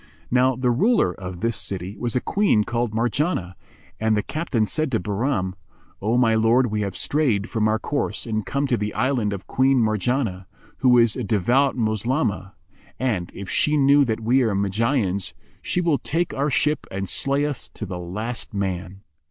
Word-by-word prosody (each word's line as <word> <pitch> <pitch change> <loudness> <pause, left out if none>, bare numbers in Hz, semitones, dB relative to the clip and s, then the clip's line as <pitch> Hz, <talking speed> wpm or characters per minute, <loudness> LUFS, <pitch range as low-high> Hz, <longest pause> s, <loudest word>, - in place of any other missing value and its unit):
Now 130 +1 +3
the 125 0 +1
ruler 165 - +3
of 90 -1 -8
this 115 -1 0
city 95 0 -4
was 120 +2 -3
a 125 - +2
Queen 200 - +2
called 120 0 -1
Marjánah, 115 - -1 0.5
and 110 -1 +2
the 105 - 0
captain 150 -9 -1
said 155 +5 -1
to 115 - +2
Bahram, 100 -3 -1 0.5
"O 110 +4 +1
my 115 -3 +4
lord, 115 +2 +3
we 105 0 -1
have 100 -3 -3
strayed 120 -9 0
from 110 -1 +1
our 110 0 +2
course 140 +5 -2
and 110 -2 -2
come 140 +6 -1
to 130 -4 +1
the 105 0 -3
island 120 -5 +1
of 100 -1 -5
Queen 135 +1 +2
Marjanah, 110 -3 0 0.3
who 125 -2 +4
is 115 -3 +4
a - - -3
devout 120 +7 +2
Moslemah; 110 -2 -1 0.5
and, 105 -9 -1
if 100 - -7
she 150 +9 +1
know 140 +1 +5
that 115 -3 -1
we 125 +4 +3
are 110 -5 +1
Magians, 100 - 0 0.3
she 180 - -1
will 165 -5 +1
take 170 +3 -1
our 140 +2 0
ship 150 +3 0
and 95 +1 -4
slay 140 +9 +1
us 145 -3 -3
to 105 - -5
the 90 -2 -6
last 110 +6 -5
man. 95 -1 -3
115 Hz, 185 wpm, -23 LUFS, 100-135 Hz, 0.5 s, know